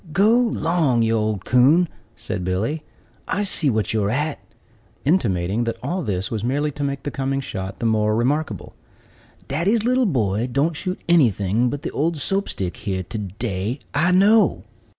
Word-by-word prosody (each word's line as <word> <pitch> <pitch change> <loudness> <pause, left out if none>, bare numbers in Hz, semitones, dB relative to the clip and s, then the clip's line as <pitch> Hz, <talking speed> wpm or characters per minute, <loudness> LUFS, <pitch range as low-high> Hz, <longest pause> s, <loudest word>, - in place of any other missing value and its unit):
"Go 200 +7 +4
'long, 165 - +2
you 115 0 +1
old 110 -3 -1
coon!" 140 +9 +4 0.3
said 90 - -5
Billy; 100 - -1 0.5
"I 200 +4 0
see 175 -6 +1
what 110 -4 0
you're 105 -2 +1
at;" 145 +6 -1 0.7
intimating 110 - +1
that 115 0 -2
all 185 +2 -2
this 100 - -2
was 110 -2 -3
merely 145 +5 0
to 145 +1 -5
make 140 -1 -3
the 145 - -3
coming 135 0 -1
shot 95 -7 -5
the 115 - -4
more 110 -1 +2
remarkable. 125 - -1 0.7
"Daddy's 200 +10 +1
little 255 0 +3
boy 115 - 0
don't 150 +5 +1
shoot 185 +4 -4
anything 120 - +3
but 145 +3 -5
the - - -3
old 160 +3 0
Soap 195 +8 -1
stick 90 -4 -4
here 95 -2 -3
to 100 +5 -6
day, 100 +3 -3 0.2
I 155 +5 +2
know." 205 +4 +4
130 Hz, 170 wpm, -22 LUFS, 105-165 Hz, 0.7 s, Go